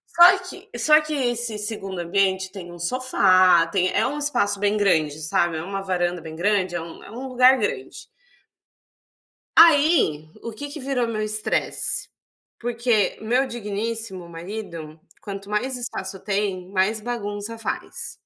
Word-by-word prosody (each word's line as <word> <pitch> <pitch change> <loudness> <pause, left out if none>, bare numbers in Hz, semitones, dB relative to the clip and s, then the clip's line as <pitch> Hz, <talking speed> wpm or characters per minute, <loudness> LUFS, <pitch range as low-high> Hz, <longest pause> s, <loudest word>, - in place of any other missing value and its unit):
só 350 +2 +8
que 365 - -11
só 305 0 +5
que 305 0 -5
esse 240 -5 -1
2ª 200 -3 -5
ambiente 190 +2 0
tem 185 -4 -9
um 175 - -10
sofá, 185 -5 +4
tem 185 0 +1
é - - +2
um 290 +3 -2
espaço 205 -9 0
bem 205 +1 +1
grande, 160 -7 +1
sabe, 165 +2 +1
é 160 - -4
uma 195 +2 -4
varanda 180 -2 -1
bem 160 0 -9
grande, 185 0 +1
é 175 - -2
um 165 0 -10
é - - -12
um 250 +4 -6
lugar 255 +1 +6
grande 240 - -4 1.5
aí, 295 - +5
o 230 - -6
que 285 +7 -7
que 300 +2 -8
virou 260 -3 -1
meu 220 -2 -3
estresse, 215 0 -1 0.5
porque 235 -3 0
meu 245 +5 +1
digníssimo 220 -4 -4
marido, 165 -3 -7 0.2
quanto 200 -1 -7
mais 250 +5 -1
espaço 195 -5 -5
tem, 195 -2 -2
mais 200 +3 +1
bagunça 210 -1 -4
faz 225 - -5
205 Hz, 150 wpm, -23 LUFS, 185-240 Hz, 1.5 s, só